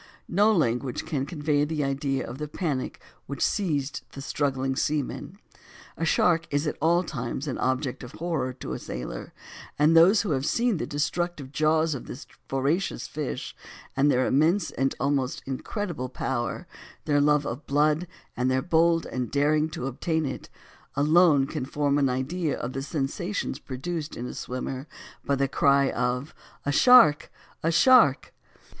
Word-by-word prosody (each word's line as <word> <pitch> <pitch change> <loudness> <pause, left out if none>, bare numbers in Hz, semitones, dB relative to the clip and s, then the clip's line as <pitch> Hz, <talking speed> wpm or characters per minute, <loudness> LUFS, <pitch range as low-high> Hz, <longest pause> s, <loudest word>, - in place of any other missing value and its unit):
No 205 +5 +3
language 125 - 0
can 140 -3 -2
convey 150 -3 0
an 145 - 0
idea 135 -1 -1
of 125 +3 -8
the 150 - -3
panic 150 -4 -3 0.3
which 140 -1 -1
seized 150 -9 -1
the 135 - -7
struggling 135 -2 -1
seamen; 150 +6 -2 0.6
a 165 - -2
shark 165 0 +2
is 145 +2 0
at 150 - -1
all 170 +3 +3
times 135 -2 -4
an 130 - -3
object 130 0 -1
of 125 - -9
horror 160 -6 -2
to 95 - -6
a - - -4
sailor; 60 -1 -6 0.5
and 155 +3 +4
those 185 +7 +6
who 200 - -2
have 135 -2 0
seen 235 -4 +1
the - - -3
destructive 150 -1 -2
jaws 155 +1 +2
of 135 - -7
this 135 - -8 0.2
voracious 140 +8 -1
fish, 150 -3 -5 0.4
and 140 +2 +3
their 130 -2 +3
immense 165 +8 +2
and 135 +1 -1
almost 135 -1 -1
incredible 135 - -4
power 130 +5 -3 0.4
their 145 -2 +3
love 150 0 +3
of 125 +4 -5
blood 150 +4 +2 0.3
and 125 +1 0
their 130 0 +1
bold 165 0 +3 0.2
daring 150 +2 +2
to 155 -5 -5
obtain 160 +4 -1
it, 135 - -6 0.5
alone 150 -1 +4
can 150 0 -4
form 145 +1 0
an 135 -2 +3
idea 145 +6 -1
of 125 +2 -5
the 135 - -3
sensations 155 +7 -3
produced 155 +4 -5
in 120 - -4
a - - -6
swimmer 130 +2 -5 0.4
by 140 - +1
the 140 0 +1
cry 140 0 +3
of 125 +4 -2 0.3
"a 145 - +1
shark! 225 - +6 0.3
a 165 - +1
shark!" 230 - +5
145 Hz, 160 wpm, -26 LUFS, 135-165 Hz, 0.6 s, those